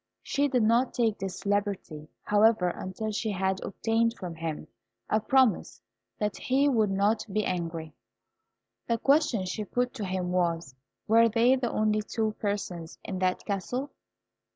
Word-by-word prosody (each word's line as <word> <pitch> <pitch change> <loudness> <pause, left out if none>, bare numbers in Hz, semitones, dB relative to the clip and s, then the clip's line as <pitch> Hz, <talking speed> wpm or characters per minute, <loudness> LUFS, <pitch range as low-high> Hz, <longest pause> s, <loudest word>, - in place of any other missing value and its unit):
She 285 +1 +1
did 250 -4 +1
not 235 +4 +2
take 225 -3 +1
this 195 +1 -5
liberty, 200 -7 -2
however, 210 -3 +4
until 190 +5 -4
she 215 +1 -2
had 190 -1 -1
obtained 230 +2 0
from 180 -3 -6
him 165 -2 -5 0.4
a 215 - +4
promise 250 -1 +2 0.4
that 210 -1 -2
he 270 +3 +2
would 225 -7 +3
not 200 +3 +1
be 215 +2 0
angry. 165 -3 -3 0.9
The 230 - +1
question 270 - +2
she 210 +4 -3
put 245 +4 -1
to 220 -6 -4
him 185 -1 -2
was, 170 -6 0 0.3
"Were 230 +1 +5
they 235 +3 +4
the 250 -3 -2
only 215 0 +1
two 220 +1 -1
persons 185 -5 -3
in 190 - -4
that 185 -1 0
castle?" 245 +8 -3
210 Hz, 155 wpm, -28 LUFS, 185-230 Hz, 0.9 s, Were